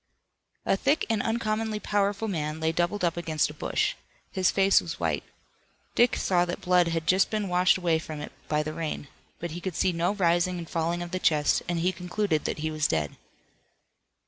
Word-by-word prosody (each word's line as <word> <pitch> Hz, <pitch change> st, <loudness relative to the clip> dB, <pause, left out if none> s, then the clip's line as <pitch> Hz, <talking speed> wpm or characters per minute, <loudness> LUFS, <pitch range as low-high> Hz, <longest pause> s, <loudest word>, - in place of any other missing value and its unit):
A -, -, +3 dB
thick 280 Hz, +10 st, +1 dB
and 220 Hz, -3 st, +1 dB
uncommonly 220 Hz, -1 st, -1 dB
powerful 205 Hz, +1 st, 0 dB
man 155 Hz, -5 st, -2 dB
lay 160 Hz, 0 st, +1 dB
doubled 175 Hz, +4 st, -1 dB
up 170 Hz, -1 st, +1 dB
against 160 Hz, -3 st, 0 dB
a -, -, -11 dB
bush. -, -, 0 dB, 0.4 s
His 185 Hz, -1 st, +2 dB
face 195 Hz, 0 st, +4 dB
was -, -, -6 dB
white. -, -, 0 dB, 0.7 s
Dick 240 Hz, +1 st, +4 dB
saw 180 Hz, -2 st, +2 dB
that 175 Hz, +1 st, -3 dB
blood 180 Hz, -2 st, +3 dB
had 165 Hz, -1 st, -1 dB
just 190 Hz, +3 st, +3 dB
been 215 Hz, -2 st, -1 dB
washed 180 Hz, +1 st, +4 dB
from 160 Hz, -3 st, -1 dB
it -, -, -7 dB, 0.2 s
by 150 Hz, 0 st, +1 dB
the 155 Hz, 0 st, -4 dB
rain. 155 Hz, -3 st, -4 dB, 0.3 s
But 170 Hz, -1 st, -5 dB
he 175 Hz, +2 st, -6 dB
could 185 Hz, -3 st, -4 dB
see 185 Hz, -, +2 dB
no 175 Hz, +4 st, 0 dB
rising 175 Hz, -1 st, +2 dB
and 170 Hz, -1 st, -6 dB
falling 170 Hz, +2 st, -1 dB
of 175 Hz, -, -8 dB
the 185 Hz, -, -2 dB
chest, 150 Hz, -4 st, +3 dB
and 175 Hz, -, 0 dB
he 180 Hz, +2 st, +2 dB
concluded 180 Hz, -2 st, -1 dB
that -, -, -2 dB
he 155 Hz, -, -1 dB
was 155 Hz, -1 st, +1 dB
dead. 75 Hz, -3 st, -1 dB
175 Hz, 200 wpm, -27 LUFS, 160-195 Hz, 0.7 s, face